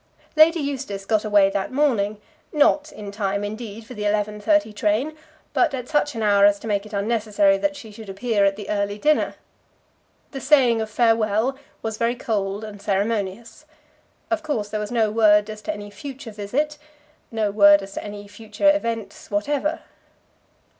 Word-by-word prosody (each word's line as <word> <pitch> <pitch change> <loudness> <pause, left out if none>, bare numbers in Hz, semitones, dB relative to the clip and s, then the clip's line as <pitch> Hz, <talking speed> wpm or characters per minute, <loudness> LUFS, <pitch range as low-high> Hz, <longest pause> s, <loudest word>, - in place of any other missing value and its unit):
Lady 325 +2 +6
Eustace 265 -9 -4
got 215 0 +1
away 205 -2 +4
that 195 +3 -2
morning, 230 -7 +1 0.3
not 300 0 +3
in 205 -1 -8
time, 200 -1 -2
indeed, 215 +1 -6
for 250 - -10
the 210 - -8
11.30 210 +5 +1
train, 215 +10 0 0.4
but 315 -6 +2
at 250 -1 -6
such 295 -3 0
an 225 - -2
hour 200 -1 +4
as 205 0 +6
to 200 - -12
make 205 -1 -1
it - - -15
unnecessary 205 -1 +2
that 295 +9 -1
she 230 -6 -10
should 210 0 -11
appear 205 +1 0
at 195 0 +3
the 205 -1 -8
early 205 0 -1
dinner. 300 +8 +1 1.0
The 270 - -6
saying 255 -5 +4
of 220 - -4
farewell 225 +2 +2 0.3
was 220 -1 -3
very 235 +1 +1
cold 205 -3 -2
and 205 -2 -9
ceremonious. 205 +5 -2 0.7
Of 335 -1 +1
course, 255 -10 -2
there 215 - -3
was 210 -1 -4
no 225 -3 +2
word 210 -1 +4
as 215 0 -9
to 315 - -3
any 205 -7 -8
future 260 +3 -8
visit, 270 +9 -2 0.5
no 220 -3 -1
word 200 -1 +6
as 195 0 -10
to - - -5
any 205 -1 -8
future 220 +8 +1
events 230 -6 -4
whatever. 285 +9 -1
215 Hz, 175 wpm, -23 LUFS, 205-250 Hz, 1.0 s, Lady